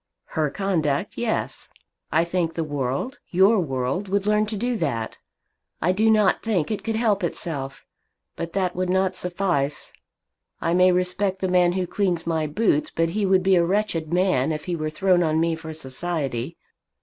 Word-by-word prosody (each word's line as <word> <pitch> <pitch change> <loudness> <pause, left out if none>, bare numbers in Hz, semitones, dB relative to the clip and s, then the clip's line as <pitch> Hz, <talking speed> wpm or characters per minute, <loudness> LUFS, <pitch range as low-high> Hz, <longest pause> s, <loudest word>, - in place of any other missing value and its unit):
"Her 155 -2 +1
conduct, 170 -2 -1
yes. 235 -2 -3 0.4
I 165 - +3
think 170 -1 -1
the 165 - -1
world, 145 - -3
your 195 +4 +4
world, 135 +4 -2
would 200 +1 0
learn 210 0 +2
to 215 0 -4
do 245 +4 -1
that. 115 - -2 0.6
I 175 - +2
do 215 +4 +2
not 215 -3 +3
think 210 -6 0
it 215 - -3
could 225 -1 -2
help 215 -4 +1
itself. 145 -5 -3 0.5
But 170 0 -5
that 185 -2 0
would 185 0 -1
not 190 0 +1
suffice. 175 -6 -2 0.7
I 165 - 0
may 180 +1 +5
respect 180 +2 0
the 190 - -1
man 180 -1 +3
who 185 0 -1
cleans 180 -3 -1
my 160 -2 0
boots. 150 -2 +1
But 165 0 0
he 200 +3 0
would 190 -1 +3
be 190 0 +4
a 175 - +4
wretched 170 -4 -1
man 175 -6 +2
if 150 -1 -4
he 175 - -2
were 155 -1 -2
thrown 180 +3 +2
on 160 -2 +1
me 165 0 +2
for 160 0 -6
society. 145 -1 -3
180 Hz, 180 wpm, -24 LUFS, 160-195 Hz, 0.7 s, may